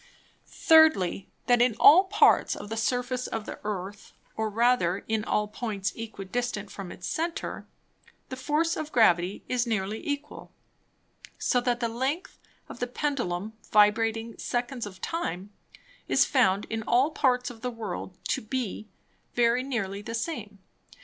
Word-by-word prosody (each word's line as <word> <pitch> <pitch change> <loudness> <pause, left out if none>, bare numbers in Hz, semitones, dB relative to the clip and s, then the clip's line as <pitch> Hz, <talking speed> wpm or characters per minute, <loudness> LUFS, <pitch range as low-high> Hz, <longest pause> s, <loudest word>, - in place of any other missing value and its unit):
Thirdly, 315 - +4 0.2
That 245 -1 +4
in 245 -3 +3
all 360 +6 +8
Parts 405 +2 +4
of 205 - -8
the 225 - -3
Surface 250 +2 -1
of 220 -2 -4
the - - -7
Earth, 205 -1 -5 0.2
or 220 0 -1
rather 210 -5 +2
in 220 -1 0
all 210 -1 0
Points 210 -3 -3
equidistant 225 -1 -4
from 195 -3 -7
its - - -9
Center, 330 +1 -3 0.6
the 260 - -5
Force 305 +5 0
of 310 0 -5
Gravity 180 -4 +3
is 245 -1 0
nearly 215 -1 -2
equal; 285 -1 -5 0.9
so 245 - +1
that 245 0 0
the 235 - +1
length 265 +10 -3 0.3
of - - -10
the 245 - -1
Pendulum 240 -8 -2 0.2
vibrating 225 +2 +3
Seconds 245 -1 -3
of 185 -2 -12
Time, 200 - -3 0.6
is - - +4
found 210 -7 +2
in 225 0 -2
all 260 +6 +3
Parts 250 -4 +1
of 225 -2 -14
the 250 - -2
World 200 -6 -6
to - - 0
be 220 -2 -4 0.5
very 240 +1 +3
near 245 -7 -2
the 230 +2 -5
same. 230 -6 -4
230 Hz, 150 wpm, -27 LUFS, 205-255 Hz, 0.9 s, all